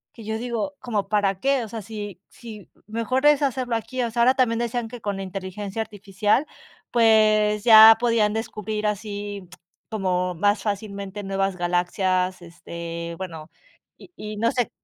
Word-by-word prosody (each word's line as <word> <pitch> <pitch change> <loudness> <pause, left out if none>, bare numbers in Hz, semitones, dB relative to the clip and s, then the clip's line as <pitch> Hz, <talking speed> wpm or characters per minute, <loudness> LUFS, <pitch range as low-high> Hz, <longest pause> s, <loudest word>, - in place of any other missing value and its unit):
que 230 - -11
yo 220 +1 -3
digo: 240 +4 -3
"¿Como 220 -6 -2
para 200 -3 +1
qué?". 270 +2 +1
O 220 - -8
sea, 225 +1 -6
si 205 -3 -8
si 220 -4 -12 0.2
mejor 230 +5 -1
es 295 -1 +5
hacerlo 255 -3 -1
aquí. 230 +3 -3
O 235 - -2
sea, 235 +1 0
ahora 255 +2 +5
también 230 -3 +2
decían 240 0 -2
que 240 +1 -10
con 205 -2 -3
la 195 - -4
inteligencia 195 +2 -5
artificial, 210 +4 0 0.5
pues, 215 -2 +4
ya 220 -1 +10
podían 230 -3 +2
descubrir 215 -1 -3
así 205 -2 -5 0.4
como 180 -4 -1
más 205 +5 +1
fácilmente 200 -1 -4
nuevas 195 0 -1
galaxias, 180 +1 0
este, 170 0 -7
bueno, 165 -4 -7 0.5
y - - -16
y 210 0 -6
no 230 +2 +1
sé 245 -2 -1
210 Hz, 160 wpm, -23 LUFS, 195-230 Hz, 0.5 s, ya